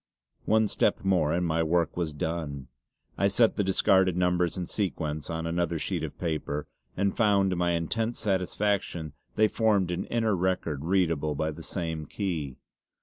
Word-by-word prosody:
One 110 0 +3
step - - +1
more 90 -6 +3
and 90 +2 +1
my 80 0 +1
work 85 +1 +1
was 85 -3 -1
done. 75 -3 -4 0.5
I 100 - +4
set 110 +3 +3
the 105 - +1
discarded 95 -1 +3
numbers 90 -1 +1
in 90 - -2
sequence 80 -7 -3
on 80 0 -3
another 85 0 0
sheet - - -2
of - - -5
paper, 75 -3 -2 0.3
and 100 +1 +1
found 100 -3 +3
to - - 0
my 85 0 +1
intense 110 +8 -1
satisfaction 95 -4 -1 0.2
they 110 - +5
formed 105 -5 +2
an 90 +2 -2
inner 115 -3 +1
record 85 -5 -1
readable 85 -5 +1
by 80 +2 -1
the 75 - -9
same 80 -3 -4
key. 80 -10 -3
90 Hz, 165 wpm, -28 LUFS, 80-95 Hz, 0.5 s, they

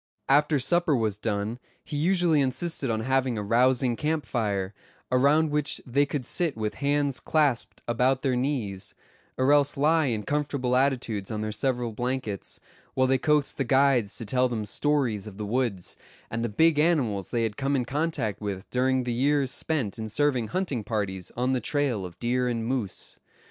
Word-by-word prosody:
After 150 +2 +4
supper 160 +3 +2
was 110 -4 -1
done 105 +2 -2 0.2
he - - -7
usually 170 -1 +3
insisted 135 +1 -1
on 110 -1 0
having 130 -1 0
a 105 - -2
rousing 125 +3 +3
camp 155 +3 -1
fire, 100 -5 -2 0.4
around 145 +5 +3
which 150 -1 0
they 140 +3 +2
could 140 -4 -3
sit 165 -3 0
with 110 -1 -2
hands 140 -1 +1
clasped 145 -6 0
about 125 +3 +1
their 130 -3 +1
knees; 125 -8 -2 0.4
or 130 +2 +3
else 145 -1 +3
lie 155 +1 +3
in 110 -4 -1
comfortable 140 -2 -1
attitudes 125 -7 0
on 110 -1 -3
their 110 0 -2
several 120 +1 -1
blankets, 120 -3 -4 0.4
while 130 - +3
they 130 0 +2
coaxed 150 0 +1
the 135 - +1
guides 130 -4 +2
to 115 - -5
tell 125 +4 +1
them 110 -3 -3
stories 120 -4 0
of 100 -2 -10
the 105 - -4
woods, 110 -5 -2 0.3
and 115 +1 -2
the 120 - -1
big 160 +8 +3
animals 130 - +1
they 120 -2 0
had 110 -2 -2
come 140 +2 0
in 125 -3 0
contact 145 -8 -2
with 100 -1 -4
during 130 +1 +1
the 120 -1 -2
years 135 +2 +1
spent 130 -10 -2
in 110 0 -4
serving 130 -2 +1
hunting 175 - -2
parties 100 -4 -3
on 125 +2 +1
the 125 - 0
trail 125 -7 -1
of 85 0 -15
deer 125 +4 0
and 115 -2 -2
moose. 120 -6 -3
125 Hz, 180 wpm, -26 LUFS, 110-145 Hz, 0.4 s, After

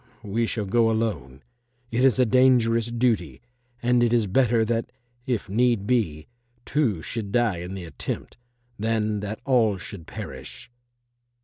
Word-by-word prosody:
We 115 +3 -1
shall 105 -2 -2
go 115 +3 +3
alone. 80 - -2 0.5
It 120 +2 +1
is 130 -5 +4
a 125 - +4
dangerous 120 -2 +4
duty, 115 - 0 0.4
and 120 0 +3
it 120 -1 +3
is 120 -3 +3
better 115 +2 +2
that, 115 +1 -1 0.4
if 120 -5 -1
need 115 0 +2
be, 95 -11 0 0.4
two 115 - 0
should 110 -4 -4
die 115 -5 +2
in 90 +3 -6
the 95 -2 -6
attempt, 80 - -6 0.4
than 110 -1 0
that 105 +1 -5
all 115 -7 +3
should 90 -2 -8
perish." - - -8
115 Hz, 145 wpm, -25 LUFS, 100-120 Hz, 0.5 s, is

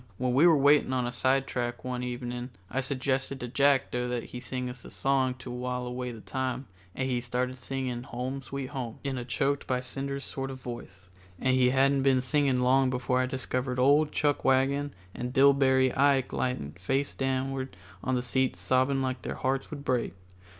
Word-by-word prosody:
When 125 0 0
we 145 +7 +6
were 165 -3 +6
waiting 140 -1 +4
on 125 -1 +1
a 120 - -2
sidetrack 125 -1 0
one 125 -1 -3
evening 125 0 -4 0.2
I 135 - 0
suggested 135 0 -1
to 125 - -4
Jackdo 135 -2 +2
that 120 -1 -2
he 125 - -8
sing 125 0 -4
us 125 -1 -8
a - - -10
song 135 -2 +1
to 125 -1 -9
while 125 0 -3
away 125 0 -4
the 115 -2 -9
time, 130 +1 -3 0.3
and 130 - -1
he 125 -2 0
started 125 +1 -1
in 130 - -10
singing 130 -1 -3
"Home, 130 +3 -4
Sweet 135 +1 -5
Home," 125 -5 -5
in 135 -2 -2
a - - -4
choked 135 +4 -1
by 125 -1 +1
cinders 140 +2 -4
sort 135 0 -4
of 130 -1 -7
voice, 100 -7 -9 0.3
and 130 - +2
he 125 -1 +4
hadn't 135 +1 +3
been 135 -1 +4
singing 135 -1 +2
long 130 +1 +4
before 125 0 0
I 130 - +1
discovered 130 0 -2
old 145 +4 +4
Chuckwagon 140 -1 +2 0.2
and 125 +1 -4
Dillbery 135 -2 +4
Ike 135 -1 +3
lying 125 - -1
face 135 +9 -1
downward 135 -3 -2 0.3
on 130 - 0
the 125 - 0
seats 130 +1 0
sobbing 130 +1 +2
like 130 -1 -2
their - - -4
hearts 135 +1 -1
would 145 -2 -7
break. 125 -5 0
130 Hz, 190 wpm, -29 LUFS, 125-135 Hz, 0.3 s, we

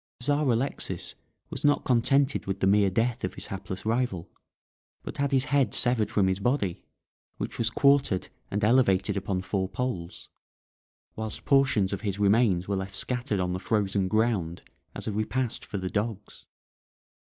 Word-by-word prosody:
The 125 - -5
Czar 145 +1 +2
Alexis 120 +4 -2 0.4
was - - -5
not 145 0 +3
contented 135 +2 +2
with 95 0 -2
the - - +1
mere 100 0 +4
death 115 +6 0
of - - -3
his - - -3
hapless 95 0 -6
rival, 110 -6 -1 0.7
but - - -7
had 140 0 0
his 135 -1 +3
head 135 -6 +3
severed 120 -4 +2
from 100 - +2
his 95 0 0
body, 100 -5 0 0.6
which - - -5
was 115 -1 +1
quartered 140 -7 +2 0.2
and 105 +1 -2
elevated 105 -4 +3
upon 95 -1 -2
four 95 -1 -2
poles, 95 -6 -4 0.9
whilst 110 -1 -5
portions 135 -9 +3
of 100 - -4
his 100 -3 -2
remains 100 -3 +3
were 100 -1 0
left 95 0 -5
scattered 120 -1 -1
on 90 -1 -1
the 90 - -3
frozen 100 -2 0
ground 105 -6 0 0.3
as - - -6
a - - -2
repast 110 +4 -2
for 105 - -5
the 95 -1 -3
dogs. 105 +1 -4
105 Hz, 165 wpm, -27 LUFS, 95-125 Hz, 0.9 s, mere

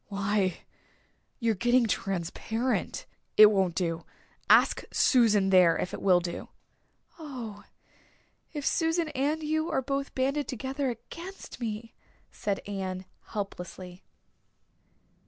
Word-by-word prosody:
Why, 200 -2 0 0.8
you're 230 -3 +1
getting 240 +4 +3
transparent. 220 +5 -2 0.3
It 215 0 +10
won't 190 -4 +1
do 165 -2 -1 0.5
ask - - +6
Susan 215 -6 +4
there 180 -3 +6
if 180 - -3
it - - -5
will 185 -2 +5
do." 175 0 -5 0.7
"Oh, 245 -9 -7 0.9
if 295 -3 -5
Susan 325 -1 +1
and 295 +3 -1
you 315 +2 0
are 265 - 0
both 275 +1 -3
banded 275 +2 0
together 265 +3 -2
against 335 - -8
me!" 225 -1 -4 0.4
said 200 -1 -2
Anne 190 -2 -4 0.2
helplessly. 185 -3 -6
220 Hz, 110 wpm, -29 LUFS, 190-275 Hz, 0.9 s, It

